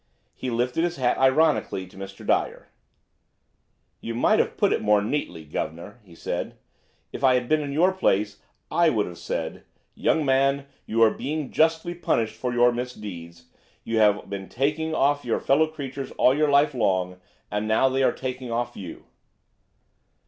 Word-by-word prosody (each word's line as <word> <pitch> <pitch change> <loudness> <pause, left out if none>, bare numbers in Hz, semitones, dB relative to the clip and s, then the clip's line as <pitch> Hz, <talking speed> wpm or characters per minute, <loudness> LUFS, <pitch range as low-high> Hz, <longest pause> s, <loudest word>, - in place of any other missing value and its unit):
He 130 - -5
lifted 125 +6 0
his 175 0 -1
hat 125 -3 0
ironically 135 -7 +2
to 90 - -18
Mr. 95 0 -9
Dyer; - - 0 1.3
"You 115 - -5
might 120 - +3
have - - 0
put - - +3
it - - -1
more 105 0 +4
neatly, 105 - -3
guv'nor," 85 +9 -5
he 90 -4 -17
said; - - -4 0.6
"if 130 - -7
I 130 -1 +5
had 125 -1 -1
been 155 +2 +2
in 145 -1 -4
your 170 +6 +3
place 105 - 0 0.3
I 170 -1 +4
would 110 -7 +1
have 90 -1 -9
said: - - -4 0.3
'Young 155 - +1
man, 135 +1 +2 0.2
you 115 +1 +3
are 110 - +6
being 150 -1 -4
justly 165 +2 +1
punished 115 -10 -1
for 125 +3 -3
your 120 0 +4
misdeeds; 100 -9 -7 0.4
you 115 0 -1
have 105 -1 +3
been 95 -1 -6
taking 150 +5 -1
off 145 +1 +2
your 120 - -1
fellow 150 +4 +3
creatures 140 -3 -6
all 130 - +4
your 150 0 +2
life 145 +1 +4
long, 95 -6 0 0.3
and 105 +1 -2
now 110 +4 +3
they 130 +1 0
are 130 - +4
taking 130 -1 -5
off 120 +1 -2
you.'" 90 -4 -9
125 Hz, 170 wpm, -25 LUFS, 105-145 Hz, 1.3 s, are